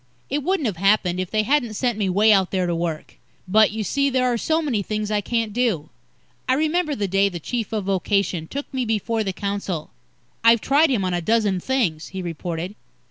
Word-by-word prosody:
It 290 +2 0
wouldn't 360 0 0
have 205 -7 -1
happened, 195 -1 +2
if 185 -1 -2
they 215 -1 +1
hadn't 245 -3 +1
sent 245 +1 0
me 205 -3 -1
way 210 +4 +5
out 190 -2 +3
there 185 -2 0
to 175 - -1
work. 165 -2 -4 0.3
But, 215 +3 +5
you 215 +1 -3
see, 280 +6 +1
there 255 -1 +1
are - - +1
so 315 +7 +1
many 270 -10 -1
things 215 +1 -3
I 210 -1 +1
can't 225 0 -1
do. 210 - 0 0.6
I 260 - +4
remember 310 +1 0
the 205 -4 -1
day 195 +1 +2
the 175 -3 -6
Chief 230 +6 -3
of 215 -2 -1
Vocation 195 -3 0
took 280 - -6
me 260 -1 0
before 225 0 -1
the 195 - -2
council. 200 -4 -4 0.5
"I've 230 0 +6
tried 290 +7 +3
him 220 -8 +1
on 185 - -1
a 175 - 0
dozen 210 -1 +1
things," 180 -10 -1
he 190 -1 -6
reported. 170 +2 -4
210 Hz, 215 wpm, -22 LUFS, 185-245 Hz, 0.6 s, I've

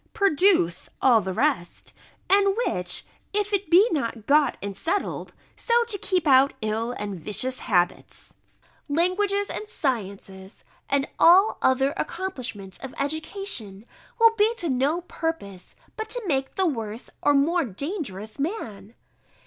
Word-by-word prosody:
_] - - -46
"produce 365 - +2
all 240 -4 +5
the 190 -1 -4
rest; 175 -1 -1 0.3
and 395 +1 +3
which, 180 0 +1 0.3
if 415 0 -1
it 395 -4 0
be 365 +6 +6
not 230 -7 -2
got 285 -1 +3
and 200 -1 -6
settled, 340 - -2 0.2
so 475 0 +2
to 465 -3 -3
keep 365 -4 0
out 275 -1 +5
ill 220 +3 -1
and 205 -5 -5
vicious 250 +10 -2
habits, 180 -6 -1 0.6
languages 395 +6 +1
and 425 - -6
sciences, 200 - -4 0.3
and 280 0 +1
all 370 +5 +6
the - - +4
other 270 +2 +2
accomplishments 255 - -5
of 265 -1 -8
education, 285 - -2 0.3
will 455 0 +6
be 425 +2 +4
to 345 -8 -3
no 280 +6 +1
purpose, 325 - -5 0.2
but 440 - -5
to - - -4
make 270 -6 -1
the 380 - +1
worse 225 -7 -4
or 290 - +3
more 330 +5 +2
dangerous 225 - -5
man." 230 - -5
280 Hz, 140 wpm, -25 LUFS, -, 0.6 s, be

